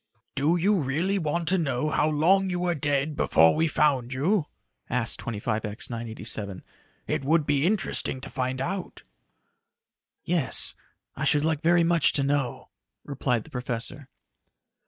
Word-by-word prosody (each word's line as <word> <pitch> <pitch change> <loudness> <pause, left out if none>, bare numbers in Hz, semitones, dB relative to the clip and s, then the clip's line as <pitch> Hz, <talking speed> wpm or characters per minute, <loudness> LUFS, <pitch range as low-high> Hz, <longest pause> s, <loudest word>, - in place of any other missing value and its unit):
"Do 145 +5 +2
you 195 +5 +3
really 165 +9 0
want 165 +1 -2
to 190 0 +2
know 150 -1 -1
how 150 +2 +2
long 185 +6 +3
you 180 -1 -2
were 175 -1 +1
dead 145 0 -1
before 80 - +4
we 160 +1 +2
found 135 -5 +1
you?" 155 +5 +1 0.4
asked 115 -2 -1
25X 110 0 -3
987. 110 -4 -3 0.4
"It - - -2
would 155 +2 +2
be 145 +2 +2
interesting 195 -9 -1
to - - -8
find 130 0 -2
out." 185 +6 -4 1.2
"Yes, 165 -6 +1 0.4
I - - -4
should 150 0 +3
like 160 -2 0
very 170 +1 +4
much 165 -2 +4
to 140 - +1
know," 140 -3 -1 0.3
replied 125 -5 -1
the - - -17
professor. 125 +2 -4
145 Hz, 145 wpm, -26 LUFS, 125-170 Hz, 1.2 s, before